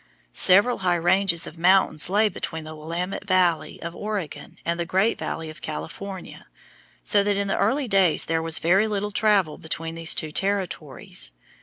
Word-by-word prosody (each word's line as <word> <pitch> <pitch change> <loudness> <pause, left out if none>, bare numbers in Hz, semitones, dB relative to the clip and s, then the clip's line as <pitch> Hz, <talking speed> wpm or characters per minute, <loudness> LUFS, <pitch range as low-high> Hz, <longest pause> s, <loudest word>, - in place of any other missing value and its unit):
Several 200 +6 +4
high 180 -2 +2
ranges 175 0 +3
of 165 - -9
mountains 180 -3 +3
lay 210 +3 +4
between 160 -5 -5
the 155 0 -8
Willamette 170 +6 -4
Valley 180 -4 +1
of 170 +1 -6
Oregon 205 -8 -5
and 170 +1 -1
the - - +1
Great 190 +6 +1
Valley 160 0 -4
of 155 +1 -10
California, 195 -2 -7 0.6
so 205 - +3
that 200 0 +1
in 200 0 0
the 195 - -1
early 275 -1 +1
days 195 -6 +3
there 160 0 0
was 165 0 0
very 190 +6 +3
little 205 -1 -2
travel 200 -6 +2
between 165 0 -4
these 165 0 +1
two 155 -2 -3
territories. 175 - -3
180 Hz, 170 wpm, -24 LUFS, 165-200 Hz, 0.6 s, Several